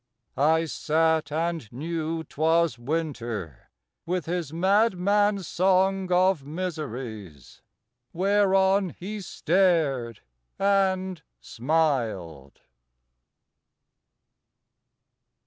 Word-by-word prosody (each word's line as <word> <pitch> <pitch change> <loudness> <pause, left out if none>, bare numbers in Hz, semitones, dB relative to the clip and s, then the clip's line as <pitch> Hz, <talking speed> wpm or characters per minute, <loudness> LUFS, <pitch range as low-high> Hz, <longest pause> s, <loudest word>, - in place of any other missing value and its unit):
I 160 +4 +3
sat 160 -1 0
And 165 -6 -2
knew 160 +4 -3
'twas 160 -2 +1
Winter 120 - -4 0.4
with 180 0 -1
his 170 -3 -3
madman 200 +2 +2
song 190 +1 +1
Of 180 -3 +3
miseries, 130 - -6 0.5
whereon 195 0 +2
he 205 +3 -6
stared 160 - +1 0.4
and 190 -3 +1 0.2
smiled. 115 - -2
165 Hz, 65 wpm, -26 LUFS, 140-190 Hz, 0.5 s, I